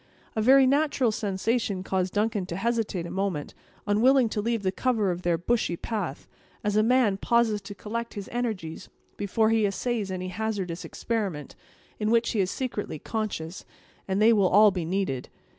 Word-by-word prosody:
A 220 - +1
very 265 +4 +6
natural 275 -3 +2
sensation 205 -1 -1
caused 190 0 -1
Duncan 210 -2 0
to 170 - -4
hesitate 220 -4 -1
a - - -6
moment, 190 -6 -2 0.3
unwilling 235 +4 +4
to 210 - -2
leave 230 -1 -1
the 185 - +1
cover 215 -2 +1
of 175 0 -4
their 175 -2 +1
bushy 175 -1 0
path, 195 - -4 0.4
as 210 0 0
a 215 - +5
man 230 -3 +3
pauses 225 -1 +2
to 200 +1 -9
collect 230 +4 -5
his 200 -2 -6
energies 215 -10 -4 0.3
before 220 +2 +1
he 225 -1 +3
essays 215 +1 -2
any 185 0 -4
hazardous 190 -4 -3
experiment, 200 -11 -3 0.4
in 210 0 0
which 230 0 +3
he 220 - -1
is 185 -2 +2
secretly 230 -10 -3
conscious 190 -3 -4 0.4
they 210 +4 +4
will 200 -4 +3
all 210 +2 +7
be 180 -3 -3
needed. 175 -8 -2
210 Hz, 170 wpm, -27 LUFS, 185-230 Hz, 0.4 s, all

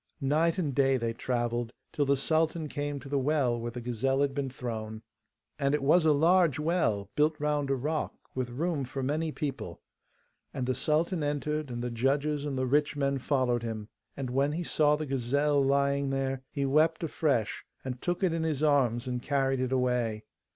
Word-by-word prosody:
Night 160 +5 +2
and 155 -7 -1
day 135 0 +3
they 115 -2 -2
travelled, 120 0 -2 0.2
till 145 - +1
the 140 0 +3
sultan 160 +2 +1
came 145 0 -3
to 135 - -10
the 140 0 0
well 130 -4 +1
where 120 +1 -3
the 120 +1 -7
gazelle 125 +3 0
had 140 -1 +1
been 140 -1 -2
thrown. 110 -3 -5 0.6
And 140 0 +2
it 150 - -2
was 160 +3 +4
a - - +6
large 165 0 +4
well, 150 - 0
built 150 +1 +2
round 150 -1 0
a 135 - +2
rock, 150 +4 -2 0.2
with 130 -1 -2
room 150 +3 -1
for 130 +1 -4
many 155 +4 -1
people; 135 - -5 0.8
and 130 -3 -1
the 130 - +1
sultan 160 +5 0
entered, 150 0 -2
and 120 -1 -4
the 125 - -2
judges 140 +5 0
and 140 -2 -3
the 130 - 0
rich 145 +3 +2
men 140 -1 0
followed 130 -3 +1
him. 110 -2 -5 0.3
And 130 -3 -3
when 140 +3 +1
he 175 +3 -2
saw 150 -2 +3
the 155 +1 -4
gazelle 140 +2 +1
lying 140 0 +2
there 135 -1 -1
he 140 -1 -2
wept 155 +4 +3
afresh, 140 -8 0 0.2
and 130 -1 -5
took 175 +2 -1
it 180 -3 +3
in 165 - -1
his 155 -3 -1
arms 130 -5 +2
and 125 -1 -3
carried 135 -1 +1
it 130 0 -1
away. 125 -4 0
140 Hz, 195 wpm, -29 LUFS, 125-150 Hz, 0.8 s, a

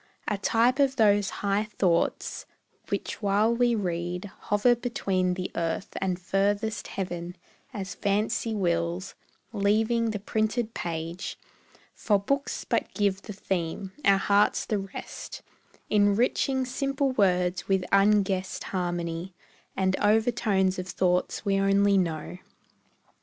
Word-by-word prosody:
A 205 -2 -1
type 235 +6 +2
of 275 -1 +3
those 205 -4 +4 0.2
high 200 +1 +2
thoughts, 170 -3 0 0.4
which - - -3
while 210 +3 +3
we 240 0 +3
read 180 -1 -3
Hover 205 +4 +4
between 195 -7 -1
the 185 0 -4
earth 165 +3 -2
and 185 -2 -1
furthest 205 +4 0
heaven 175 -2 -5 0.4
As 195 -5 -5
fancy 215 +3 0
wills, 170 -1 -1 0.4
leaving 220 +3 +2
the 215 - -2
printed 220 +3 -1
page; 170 +2 -4 0.6
For 205 - +2
books 275 +8 -2
but - - -1
give 200 -2 +1
the 210 - -8
theme, 190 -1 -3
our 195 -1 +5
hearts 200 +1 +2
the 210 - -1
rest, 195 0 -8 0.4
Enriching 230 +6 +2
simple 275 +2 -1
words 180 -5 +1
with 190 -2 +1
unguessed 195 -2 +2
harmony 175 -1 -3 0.4
And 190 0 +2
overtones 210 -3 +2
of 185 - -5
thought 180 -1 0
we 195 -1 +2
only 195 0 +4
know. 170 0 -3
195 Hz, 120 wpm, -27 LUFS, 185-215 Hz, 0.6 s, our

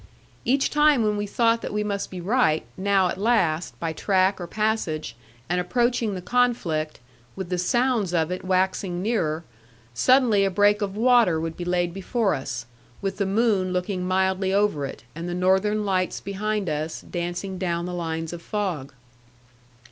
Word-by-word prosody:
Each 270 +2 +2
time 295 -4 +4
when 210 -1 +1
we 205 0 -2
thought 230 +2 +2
that - - -5
we 210 0 -1
must 200 -1 -3
be 185 - -7
right, 180 -4 +2
now 190 -1 +2
at 185 - -4
last, 180 -7 +1
by 165 -1 -2
track 190 +2 +1
or 175 - -5
passage, 175 - -1 0.3
and 180 +1 +1
approaching 235 +2 0
the 180 - -6
conflict, 185 -12 0 0.4
with 190 -2 -5
the 180 -1 -1
sounds 240 0 +1
of 165 -1 +1
it 180 - -4
waxing 185 -1 0
nearer, 170 -8 0 0.5
suddenly 230 - +4
a 195 - +2
break 205 +2 +3
of 200 0 -3
water 235 -8 +4
would 165 0 -4
be 175 - -5
laid 175 -1 0
before 200 +3 0
us, 125 -2 -4 0.3
with 195 -1 -3
the 200 -2 0
moon 195 -3 +1
looking 180 0 -2
mildly 190 +1 +1
over 195 -8 +1
it, 110 - -10
and 170 +2 -5
the 175 - -3
northern 190 +4 +2
lights 185 -2 0
behind 205 0 -2
us, 155 +1 -3
dancing 175 +2 -4
down 170 -2 -1
the 180 - -5
lines 165 -1 -3
of 170 - -7
fog. 175 -10 -3
190 Hz, 170 wpm, -24 LUFS, 175-210 Hz, 0.5 s, time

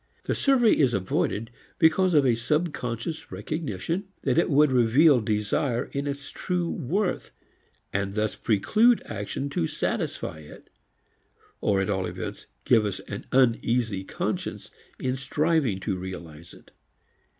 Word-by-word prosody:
The - - -1
survey 255 -5 +4
is 130 -6 +3
avoided 100 +4 -1 0.3
because 175 +2 +4
of 145 -2 +5
a 125 - +4
subconscious 145 +1 -2
recognition 155 - -3 0.2
that 135 +2 +2
it 170 - +2
would 150 -1 +4
reveal 130 +3 +5
desire 110 +4 -1
in 140 +1 -3
its 140 0 -5
true 180 -2 -2
worth 180 - -1 0.6
and 100 0 -1
thus 110 -1 0
preclude 215 - +3
action 105 +6 -4
to 80 - 0
satisfy 80 - -3
it 75 -1 -14 0.9
or 100 -2 +2
at 95 - -1
all 95 -2 -1
events - - -6 0.2
give 115 -3 +5
us 100 -3 -2
an 100 - -8
uneasy 115 -5 +2
conscience - - -4 0.3
in 130 0 -1
striving 140 - 0
to 95 - -1
realize 85 -3 -8
it. - - -19
125 Hz, 135 wpm, -26 LUFS, 100-155 Hz, 0.9 s, of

